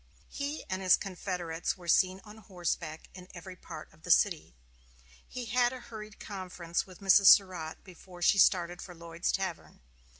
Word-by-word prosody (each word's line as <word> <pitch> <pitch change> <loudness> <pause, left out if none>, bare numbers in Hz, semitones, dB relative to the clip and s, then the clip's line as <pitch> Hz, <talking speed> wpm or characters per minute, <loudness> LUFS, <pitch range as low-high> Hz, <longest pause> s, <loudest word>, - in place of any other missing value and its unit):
He 285 +2 -4
and 185 0 -3
his 185 -1 +5
confederates 180 -4 -4
were 175 -1 -13
seen 185 +2 +3
on 210 0 -13
horseback 175 -5 -4
in 180 -1 -12
every 180 +2 -9
part 160 -3 -10
of 155 - -23
the 180 - -10
city. 170 - +3 0.7
He 250 -1 -6
had 245 +2 +2
a 260 - -7
hurried 215 -3 -10
conference 180 -4 -4
with 185 +1 -14
Mrs. 195 0 +6
Surratt 180 -6 +4
before 180 -1 -11
she 200 - +4
started 175 -2 +3
for 180 - -10
Lloyd's 170 0 -3
tavern. 190 -4 -4
185 Hz, 165 wpm, -30 LUFS, 170-200 Hz, 0.7 s, Mrs